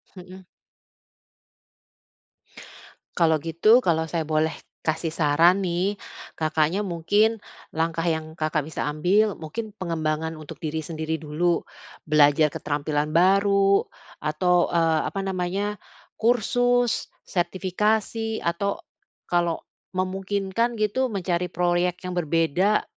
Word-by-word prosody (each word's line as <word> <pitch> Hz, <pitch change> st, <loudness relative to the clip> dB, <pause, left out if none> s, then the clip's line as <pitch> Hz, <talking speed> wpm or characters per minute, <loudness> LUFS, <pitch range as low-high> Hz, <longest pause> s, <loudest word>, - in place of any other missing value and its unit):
Mhm. 185 Hz, +1 st, -11 dB, 2.7 s
Kalau 160 Hz, -2 st, +4 dB
gitu 165 Hz, +9 st, +4 dB
kalau 160 Hz, -8 st, +1 dB
saya 165 Hz, -1 st, -2 dB
boleh 155 Hz, +1 st, +1 dB, 0.3 s
kasih 160 Hz, 0 st, -1 dB
saran 165 Hz, +5 st, +4 dB
nih, 185 Hz, +3 st, 0 dB, 0.4 s
Kakaknya 155 Hz, +4 st, +1 dB
mungkin 205 Hz, +5 st, +1 dB, 0.3 s
langkah 165 Hz, +1 st, -1 dB
yang 160 Hz, -2 st, -2 dB
Kakak 155 Hz, -2 st, -1 dB
bisa 155 Hz, -1 st, -3 dB
ambil 190 Hz, +7 st, +2 dB
mungkin 190 Hz, +8 st, -6 dB
pengembangan 160 Hz, -2 st, -2 dB
untuk 155 Hz, -2 st, -10 dB
diri 160 Hz, 0 st, -3 dB
sendiri 160 Hz, 0 st, -3 dB
dulu, 165 Hz, +3 st, 0 dB, 0.5 s
belajar 150 Hz, 0 st, +5 dB
keterampilan 150 Hz, +1 st, -2 dB
baru 195 Hz, +2 st, +4 dB, 0.3 s
atau, 175 Hz, +4 st, +2 dB
eee, 165 Hz, -2 st, +3 dB
apa 195 Hz, -, -4 dB
namanya 195 Hz, +2 st, -2 dB, 0.4 s
kursus 245 Hz, +1 st, +2 dB, 0.2 s
sertifikasi 210 Hz, +5 st, -1 dB
atau 190 Hz, +4 st, -1 dB, 0.5 s
kalau 175 Hz, -2 st, +1 dB, 0.3 s
memungkinkan 195 Hz, +4 st, -1 dB
gitu 215 Hz, +4 st, 0 dB
mencari 180 Hz, -5 st, -1 dB
proyek 175 Hz, 0 st, +1 dB
yang 180 Hz, -, -4 dB
berbeda, 170 Hz, +5 st, +2 dB
175 Hz, 100 wpm, -24 LUFS, 160-200 Hz, 2.7 s, belajar